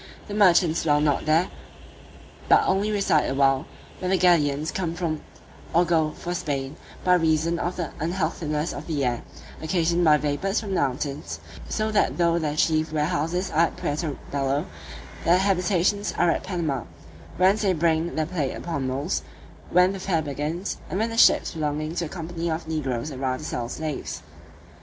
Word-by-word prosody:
The 205 - -6
merchants 180 -5 +4
dwell 150 -2 +3
not 150 -2 +1
here, 160 +4 +3 1.0
but - - +6
only 200 +3 +1
reside 195 -7 +2
awhile, 135 +1 +2 0.3
when 185 - -2
the 190 - +3
galleons 155 -4 +3
come 170 -3 -2
from 165 -3 -2 0.5
or 175 +1 +5
go 160 -2 +2
for 175 - -4
Spain, 145 -5 -3 0.3
by 180 - +4
reason 165 0 +2
of 175 +2 -2
the 170 -5 -3
unhealthiness 160 -2 -1
of - - -7
the 145 -5 0
air, 120 -1 -1 0.4
occasioned 170 +1 +1
by 155 -2 +6
vapours 150 +8 -1
from 215 - -6
the - - +2
mountains; 135 - -3 0.3
so 215 0 -1
that 210 - +2
though 170 -1 +3
their 150 -2 -2
chief 155 0 +2
warehouses 165 +4 -1
are 165 +2 +4
at - - -11
Puerto 150 0 -2
Bello, 140 +2 0 0.6
their 175 +2 +5
habitations 195 +1 +1
are 170 - +4
at - - -1
Panama, 165 -9 -2 0.5
whence 190 +4 +4
they 200 -3 +3
bring 165 0 +1
the 155 - 0
plate 150 -5 -2
upon 140 -6 -3
mules, 140 +7 -1 0.5
when 180 +1 +4
the 195 - -6
fair 175 -4 0
begins, 150 +6 -3
and 185 - -2
when 225 +2 0
the - - -4
ships - - +5
belonging 155 0 -2
to 175 0 -2
the - - -7
company 170 0 -4
of 160 0 -3
negroes 145 -3 -2
arrive 130 -1 -2
to - - -7
sell 120 -5 -3
slaves. 155 -3 -5
160 Hz, 175 wpm, -25 LUFS, 150-180 Hz, 1.0 s, but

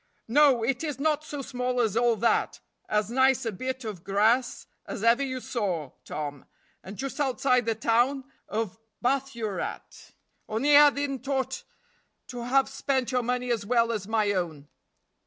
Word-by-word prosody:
"No, 265 -1 +4
it 255 +4 0
is 295 -3 -3
not 305 +1 +1
so 290 -2 -6
small 250 -1 -2
as 220 -4 +1
all 235 0 +3
that; 230 +2 +1 0.3
as 210 +1 0
nice 260 0 +3
a 225 - -1
bit 260 +6 -4
of 200 -6 -6
grass 220 +5 +1 0.2
as 205 - -5
ever 230 +3 +4
you 260 -2 -2
saw, 185 - -3
Tom, 145 -2 -5 0.4
and 190 +2 -9
just 275 +2 -5
outside 255 -3 +1
the 225 - +1
town 240 +5 +1 0.3
of 220 -1 -3 0.2
Bathurat; 245 -7 -3 0.4
only 270 +7 +3
I 295 0 +9
didn't 280 -2 -4
ought 265 -2 -1 0.7
to 245 -2 -6
have 270 +2 +3
spent 265 -3 -1
your 250 -1 +1
money 250 +1 -1
as 225 -3 0
well 235 +2 +2
as 210 -4 -3
my 215 -2 +1
own." 160 -7 -3
245 Hz, 160 wpm, -27 LUFS, 215-265 Hz, 0.7 s, I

